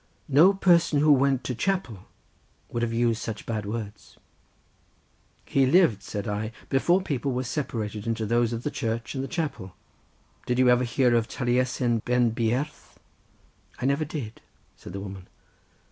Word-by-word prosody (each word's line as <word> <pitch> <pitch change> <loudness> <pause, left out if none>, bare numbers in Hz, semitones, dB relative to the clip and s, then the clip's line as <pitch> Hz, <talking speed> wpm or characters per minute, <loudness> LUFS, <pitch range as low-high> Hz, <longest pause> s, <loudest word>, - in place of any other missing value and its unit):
"No 155 +8 +7
person 175 -6 +3
who 150 +1 +5
went 135 -2 +3
to 125 - -3
chapel 125 - -2 0.6
would 120 - -3
have 120 -1 0
used 115 -1 +1
such 110 -2 -5
bad 110 -3 -3
words." 105 -1 -7 1.3
"He 135 -1 +2
lived," 135 - +4
said 105 0 -5
I, 110 +2 -3 0.2
"before 175 +8 +2
people 140 -5 -2
were 125 +1 -1
separated 115 -6 -4
into 115 -1 -1
those 120 +1 +1
of 115 0 -4
the 150 - -2
Church, 115 -2 -3
and 135 -1 -3
the - - -4
chapel; 135 - -4 0.7
did 125 - 0
you 130 -1 +5
ever 125 +1 +4
hear 120 +1 +2
of 115 -1 +2
Taliesin 125 -1 0
Ben 120 +1 +1
Beirdd?" 120 +6 0 1.1
"I - - -3
never 140 +3 +1
did," 135 -8 -6 0.3
said 85 - -11
the 100 - -4
woman. 95 -2 -8
120 Hz, 160 wpm, -26 LUFS, 110-140 Hz, 1.3 s, No